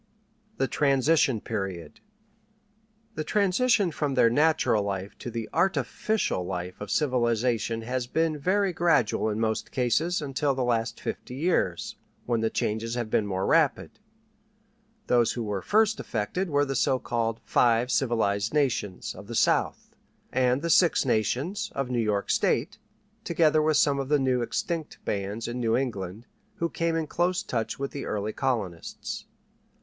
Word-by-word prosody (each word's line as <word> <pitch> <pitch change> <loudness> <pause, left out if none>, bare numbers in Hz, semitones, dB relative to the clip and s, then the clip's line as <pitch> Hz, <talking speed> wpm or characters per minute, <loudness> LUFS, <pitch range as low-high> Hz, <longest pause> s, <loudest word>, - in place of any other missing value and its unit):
THE 135 - +1
TRANSITION 140 -4 +2
PERIOD 95 -6 -5 1.1
The 155 - -3
transition 200 +2 +2
from 145 -3 -2
their 115 -3 +5
natural 150 -6 +3
life 100 0 -4
to - - -6
the 115 -1 -4
artificial 195 - 0
life 90 +1 -5
of 105 - -6
civilization 120 -4 0
has 125 +1 -2
been 160 +2 0
very 190 +4 +1
gradual 165 -11 +2
in 105 0 -2
most 110 -1 -1
cases, 150 +8 +1
until 140 -1 -1
the 130 - -1
last 115 -1 -1
fifty 125 - -5
years, 135 - 0 0.3
when 120 -2 0
the 110 - +1
changes 110 +3 -2
have 120 -3 -3
been 105 - +2
more 95 -1 -1
rapid. 160 +3 +1 1.1
Those 120 -2 +3
who 120 - -3
were 105 -3 -3
first 220 - +2
affected 145 - -2
were 145 -1 +2
the 135 -1 -3
so 130 - +2
called 115 -2 -2
"Five 120 +1 +3
Civilized 110 -3 +1
Nations" 125 -10 -1
of 95 +2 -11
the 115 - -6
South, - - +1 0.4
and 130 +2 +1
the 170 - +1
"Six 170 -4 +4
Nations" 130 - -1
of 135 -2 -2
New 120 - 0
York 105 -2 0
State, - - 0 0.4
together 155 -2 +3
with 155 0 +2
some 140 -2 +3
of 135 0 -3
the 150 - +4
now 130 -2 +1
extinct 160 +6 -3
bands 100 +3 -3
in 120 +1 -4
New 115 -2 +1
England, 110 -4 -4 0.3
who 170 - -1
came 165 0 -1
in 165 -1 0
close 180 +5 0
touch 115 - -3
with 140 0 -4
the 140 - -5
early 105 +1 -2
colonists. 110 - -3
125 Hz, 155 wpm, -27 LUFS, 110-155 Hz, 1.1 s, their